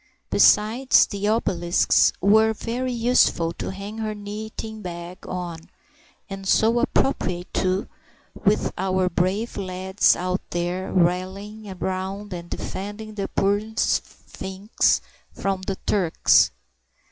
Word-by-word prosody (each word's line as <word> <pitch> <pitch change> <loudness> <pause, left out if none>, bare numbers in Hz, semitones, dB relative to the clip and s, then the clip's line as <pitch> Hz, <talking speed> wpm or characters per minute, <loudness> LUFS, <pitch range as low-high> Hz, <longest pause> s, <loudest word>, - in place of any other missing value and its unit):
Besides, 230 +5 +5
the 205 0 -3
obelisks 180 -6 +3
were 220 +3 +5
very 245 +4 -3
useful 230 -8 +2
to - - -5
hang 200 +3 -7
her 215 -1 -3
knitting 215 +1 -7
bag 175 -1 -8
on, 175 -2 -4 0.7
and 195 -1 -7
so 225 +5 +4
appropriate 180 -10 0
too, 185 +1 0 0.5
with - - +1
our 185 -1 +1
brave 190 +6 -1
lads 190 +1 +2
out 180 +1 -2
there 175 +2 -2
rallying 190 +4 -1
round 190 +2 -4
and 170 -1 -7
defending 205 +2 -6
the 200 -2 -3
poor 200 +1 +1
sphinx 195 -2 0 0.3
from 195 -1 -2
the 195 - -1
Turks. 185 -6 +4
195 Hz, 110 wpm, -23 LUFS, 185-215 Hz, 0.7 s, Besides